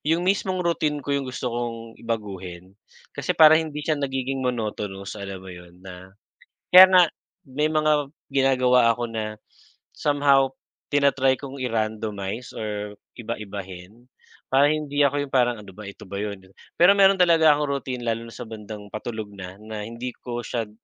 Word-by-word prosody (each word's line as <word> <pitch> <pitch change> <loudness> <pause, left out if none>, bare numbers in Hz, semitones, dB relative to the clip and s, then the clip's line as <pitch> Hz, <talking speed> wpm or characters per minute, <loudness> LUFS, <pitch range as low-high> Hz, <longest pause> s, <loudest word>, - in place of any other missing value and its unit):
yung 165 +4 0
mismong 185 -1 0
routine 155 -3 0
ko 140 - -2
yung 140 -2 -1
gusto 125 -1 -4
kong 115 -1 -5
baguhin. 95 -5 -5 0.4
Kasi - - -3
parang 160 0 +8
hindi 150 0 -6
siya 155 -2 0
nagiging 135 -1 -2
monotonous. 105 -5 -3
Alam 95 -1 -7
mo 95 - -9
yun 90 0 -13
na, 95 +1 -12 0.5
kaya 185 +1 +11
nga 180 - +8 0.5
may 150 +4 0
mga 155 -2 +1 0.2
ginagawa 130 -3 +3
ako 120 - -5
na 110 -1 -4 0.6
somehow, 140 -2 +3 0.5
tina-try 140 -2 +3
kong 140 -1 -8
i-randomize 110 -2 -3
or 105 -1 -5 0.2
iba-ibahin 105 -1 -8 0.4
para 140 +2 +4
hindi 150 -1 -1
ako 145 0 +1
yung 135 - -18
parang, 120 -2 +3
"Ano 100 -2 -12
ba, 105 0 -8
ito 100 - -12
ba 100 +1 -5
yun?" 100 -2 -4 0.4
Pero 180 +3 +7
meron 195 -1 +5
talaga 165 -3 +5
akong 145 0 -1
routine 130 -3 -3
lalo 115 0 -2
na - - -13
sa 125 - -8
bandang 105 -1 -9
patulog 110 -1 -5
na, 95 -1 -9
na 110 0 -7
hindi 120 +2 -6
ko 120 -1 -5
siya 115 -3 -3
120 Hz, 160 wpm, -24 LUFS, 105-145 Hz, 0.6 s, kaya